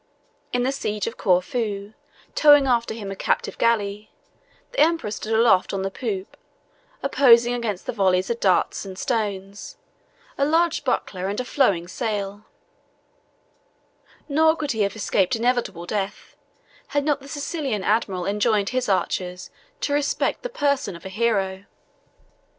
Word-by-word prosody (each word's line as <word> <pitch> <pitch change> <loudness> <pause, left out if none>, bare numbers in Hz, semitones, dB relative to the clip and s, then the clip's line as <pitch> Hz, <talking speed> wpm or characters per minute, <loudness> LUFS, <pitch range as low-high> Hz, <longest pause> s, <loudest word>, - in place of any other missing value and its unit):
In 245 0 +1
the 260 - +1
siege 210 -6 -3
of 230 - -4
Corfu, 200 +1 0 0.4
towing 290 -2 +6
after 235 -3 +1
him 205 -3 -6
a - - -5
captive - - -1
galley, 210 -2 0 0.6
the - - -4
emperor 325 -9 +2
stood 215 +1 -5
aloft 220 -4 +3
on 190 - -2
the 195 - -2
poop, 195 -4 -4 0.7
opposing 245 -3 +5
against 225 -6 -3
the - - -2
volleys 190 -3 +2
of 235 - -2
darts 185 -3 +2
and 190 -2 -8
stones, 205 -6 -3 0.6
a - - +3
large 325 +3 +2
buckler 190 -8 -1
and 205 +3 -2
a 250 - -2
flowing 190 -11 +1
sail; 205 -1 -4 1.8
nor 315 +2 +4
could 295 -3 -2
he 220 - -1
have 200 0 0
escaped 200 -3 +1
inevitable 235 -7 -1
death, 200 +1 -4 0.5
had 285 -1 -1
not 295 -2 +1
the 275 - -12
Sicilian 280 - -3
admiral 195 -4 0
enjoined 205 0 +1
his 255 -3 -1
archers 180 -1 -1 0.3
to 285 - -1
respect 290 0 0
the - - -4
person 280 - 0
of 170 - -13
a - - -5
hero. 195 -2 0
220 Hz, 145 wpm, -23 LUFS, 195-265 Hz, 1.8 s, towing